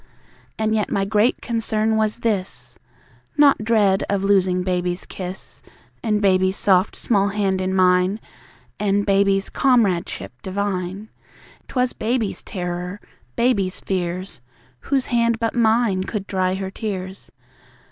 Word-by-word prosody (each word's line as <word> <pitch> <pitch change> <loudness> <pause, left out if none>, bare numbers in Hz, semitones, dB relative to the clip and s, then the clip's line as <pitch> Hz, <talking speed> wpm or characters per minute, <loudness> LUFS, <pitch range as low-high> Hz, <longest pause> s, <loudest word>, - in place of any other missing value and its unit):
And 220 0 0
yet 215 -2 0
my 195 - 0
great 215 +4 +2
concern 220 -2 0
was 220 +1 0
this 205 -5 -2 0.6
(Not 285 -6 +5
dread 210 -4 +3
of 200 -1 0
losing 185 -2 +2
Baby's 180 -1 -1
kiss, 185 0 -8 0.4
And 215 -3 +1
Baby's 190 0 +3
soft 190 0 +3
small 200 -3 +1
hand 195 -2 0
in 185 0 -1
mine, 185 +2 +3 0.6
And 205 0 +1
Baby's 195 -1 +2
comradeship 220 -10 +1
divine), 195 +1 -3 0.6
'Twas 250 -1 0
BABY'S 225 -1 -1
terror, 180 +1 -5 0.4
BABY'S 200 -7 +1
fears! 185 -4 -3 0.4
Whose 270 -2 0
hand 235 -2 +1
but 230 -1 -1
mine 220 -4 +2
could 205 -1 -4
dry 185 -1 0
her 190 0 -4
tears? 190 -3 -6
200 Hz, 125 wpm, -21 LUFS, 185-220 Hz, 0.6 s, Not